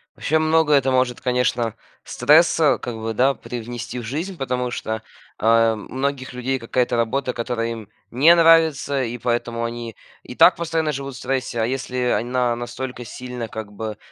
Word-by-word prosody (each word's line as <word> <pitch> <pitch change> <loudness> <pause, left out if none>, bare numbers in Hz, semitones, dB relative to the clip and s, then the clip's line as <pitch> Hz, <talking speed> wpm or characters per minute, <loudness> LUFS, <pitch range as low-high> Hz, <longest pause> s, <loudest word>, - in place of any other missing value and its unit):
Вообще 160 +1 +1
много 155 -1 +3
это 135 -2 +4
может, 130 -1 +1
конечно, 125 -3 0 0.3
стресса, 160 0 +4
как 120 - -5
бы 110 0 -4
да, 135 +4 +3
привнести 120 0 -6
в - - -7
жизнь. 160 - -4
Потому 125 -4 -2
что, 110 -2 -4 0.4
э, 115 0 +4
у - - -4
многих 130 +3 -4
людей 125 +2 -2
какая-то 120 +1 -1
работа, 125 +3 0
которая 115 -1 -2
им 110 -3 -9 0.2
не 145 +8 +6
нравится, 160 -5 +4
и 120 0 -4
поэтому 120 0 -1
они 115 -1 -5 0.3
и - - -9
так - - +7
постоянно 160 -2 -1
живут 140 -1 -5
в - - -9
стрессе. 130 -3 -2
А - - +2
если 130 0 -4 0.2
она 120 +1 0
настолько 120 +1 -6
сильно, 125 0 -6
как 110 -1 -7
бы, 110 0 -6
125 Hz, 170 wpm, -22 LUFS, 115-140 Hz, 0.4 s, так